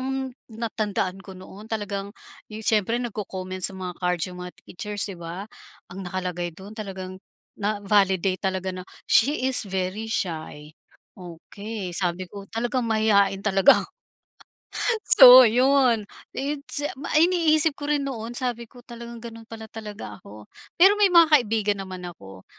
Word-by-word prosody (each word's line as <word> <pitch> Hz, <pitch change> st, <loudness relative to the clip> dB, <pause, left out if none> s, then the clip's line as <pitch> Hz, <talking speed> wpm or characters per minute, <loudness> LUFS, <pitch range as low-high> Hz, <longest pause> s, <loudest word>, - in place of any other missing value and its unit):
ang 260 Hz, -, -3 dB, 0.4 s
natandaan 215 Hz, -4 st, -3 dB
ko 195 Hz, -1 st, -11 dB
noon 195 Hz, +3 st, -12 dB
talagang 205 Hz, -3 st, -4 dB, 0.4 s
yung 215 Hz, 0 st, -8 dB
siyempre 220 Hz, +1 st, +2 dB
nagko-comments 185 Hz, -4 st, -2 dB
sa 195 Hz, -, -11 dB
mga 185 Hz, -1 st, -6 dB
card 180 Hz, -1 st, 0 dB
yung 180 Hz, -1 st, -8 dB
mga 180 Hz, 0 st, -7 dB
teachers 205 Hz, +2 st, -5 dB
di 200 Hz, -, -4 dB
ba? 170 Hz, +3 st, -7 dB, 0.5 s
Ang 190 Hz, 0 st, -7 dB
nakalagay 180 Hz, -2 st, -4 dB
dun 195 Hz, +3 st, -11 dB
talagang 190 Hz, -3 st, -7 dB, 0.4 s
na-validate 200 Hz, -3 st, +1 dB
talaga 190 Hz, 0 st, -3 dB
na, 185 Hz, 0 st, -7 dB, 0.2 s
"She 270 Hz, +3 st, +3 dB
is 260 Hz, -1 st, +2 dB
very 190 Hz, +3 st, -3 dB
shy". 155 Hz, -7 st, -4 dB, 0.5 s
Okey, 190 Hz, +3 st, -8 dB
sabi 175 Hz, 0 st, -1 dB
ko 200 Hz, -1 st, -9 dB
talagang 240 Hz, +2 st, -2 dB
mahiyain 200 Hz, -3 st, +2 dB
talaga. 195 Hz, -2 st, +5 dB, 1.4 s
So 255 Hz, -1 st, +12 dB
yun, 250 Hz, -1 st, +3 dB, 0.3 s
its 285 Hz, +1 st, -3 dB
ma 280 Hz, +1 st, -7 dB
iniisip 320 Hz, -3 st, +3 dB
ko 290 Hz, 0 st, -6 dB
rin 295 Hz, -1 st, +1 dB
noon 235 Hz, -3 st, -5 dB
sabi 245 Hz, -3 st, -3 dB
ko 250 Hz, -, -16 dB
talagang 235 Hz, 0 st, -9 dB
ganun 230 Hz, -1 st, -9 dB
pala 225 Hz, 0 st, -9 dB
talaga 210 Hz, -, -9 dB
ako. 105 Hz, +1 st, -13 dB, 0.3 s
Pero 385 Hz, +4 st, +7 dB
may 415 Hz, -1 st, +4 dB
mga 340 Hz, -2 st, +7 dB
kaibigan 215 Hz, -5 st, +1 dB
naman 185 Hz, -1 st, -8 dB
ako. 95 Hz, -, -12 dB
205 Hz, 145 wpm, -24 LUFS, 185-235 Hz, 1.4 s, So